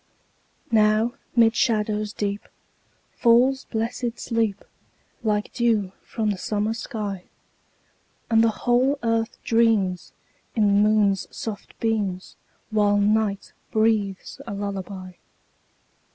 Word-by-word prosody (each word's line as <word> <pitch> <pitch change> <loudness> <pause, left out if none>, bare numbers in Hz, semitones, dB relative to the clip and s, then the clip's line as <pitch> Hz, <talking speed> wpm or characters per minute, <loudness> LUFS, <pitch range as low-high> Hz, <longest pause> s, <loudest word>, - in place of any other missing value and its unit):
Now 215 +1 +3 0.2
'mid 230 -1 +5
shadows 215 -2 +1
deep 205 -1 -3 0.6
Falls 250 +3 +3
blessed 230 +1 -3
sleep, 225 -4 -1 0.6
Like 210 -2 -1
dew 225 -6 +1
from 220 -2 -2
the 195 - -4
summer 210 +2 -1
sky; 210 -5 -5 1.0
And 225 -1 +4
the 230 - +4 0.2
whole 255 +4 +3
earth 230 0 0
dreams, 220 -6 +2 0.4
In 220 -3 +3
the 205 +1 +4
moon's 205 -3 +2
soft 215 -3 -7
beams, 205 -5 -2 0.4
While 205 -1 +3
night 205 0 +1 0.2
breathes 215 -3 0
a 200 - -4
lullaby. 195 -2 -5
215 Hz, 105 wpm, -24 LUFS, 205-230 Hz, 1.0 s, mid